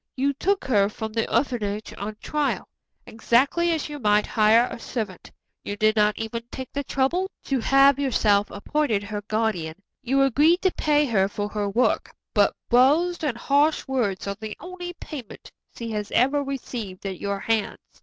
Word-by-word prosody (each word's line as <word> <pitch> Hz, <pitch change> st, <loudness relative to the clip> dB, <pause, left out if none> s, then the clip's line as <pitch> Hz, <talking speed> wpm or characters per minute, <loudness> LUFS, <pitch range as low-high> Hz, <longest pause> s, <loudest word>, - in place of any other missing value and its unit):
You 275 Hz, +2 st, +1 dB
took 385 Hz, +7 st, 0 dB
her 205 Hz, -7 st, +3 dB
from 220 Hz, 0 st, -6 dB
the 225 Hz, 0 st, -1 dB
orphanage 215 Hz, -6 st, -1 dB
on 210 Hz, +1 st, -5 dB
trial, 300 Hz, -1 st, -1 dB, 0.4 s
exactly 270 Hz, +9 st, +2 dB
as 320 Hz, -3 st, -1 dB
you 295 Hz, -1 st, -7 dB
might 210 Hz, -3 st, +3 dB
hire 225 Hz, +2 st, +4 dB
a -, -, -7 dB
servant. 215 Hz, -7 st, -5 dB, 0.3 s
You 205 Hz, -, -5 dB
did 215 Hz, +1 st, +3 dB
not 210 Hz, -1 st, +3 dB
even 225 Hz, +1 st, -4 dB
take 260 Hz, -1 st, -8 dB
the 285 Hz, -, -2 dB
trouble 310 Hz, +9 st, 0 dB
to 270 Hz, -2 st, -1 dB
have 275 Hz, +3 st, +5 dB
yourself 210 Hz, -7 st, +2 dB
appointed 225 Hz, -1 st, -1 dB
her 205 Hz, 0 st, -5 dB
guardian. 215 Hz, -8 st, -1 dB, 0.3 s
You 270 Hz, +1 st, +2 dB
agreed 300 Hz, +8 st, +3 dB
to 375 Hz, -, +3 dB
pay 295 Hz, -2 st, +2 dB
her 200 Hz, -7 st, +2 dB
for 205 Hz, +1 st, -4 dB
her 205 Hz, -1 st, -2 dB
work, 235 Hz, +6 st, 0 dB, 0.2 s
but -, -, +3 dB
blows 305 Hz, +9 st, +3 dB
and 270 Hz, -6 st, -1 dB
harsh 290 Hz, +5 st, +2 dB
words 235 Hz, -8 st, -1 dB
are 200 Hz, -, -2 dB
the 215 Hz, -1 st, -6 dB
only 355 Hz, -1 st, -7 dB
payment 285 Hz, -, -10 dB, 0.2 s
she 230 Hz, -1 st, -5 dB
has 210 Hz, -1 st, -3 dB
ever 285 Hz, +3 st, +3 dB
received 235 Hz, -8 st, -6 dB
at 190 Hz, -2 st, -4 dB
your 200 Hz, 0 st, -2 dB
hands. 225 Hz, -3 st, 0 dB
235 Hz, 175 wpm, -24 LUFS, 210-285 Hz, 0.4 s, have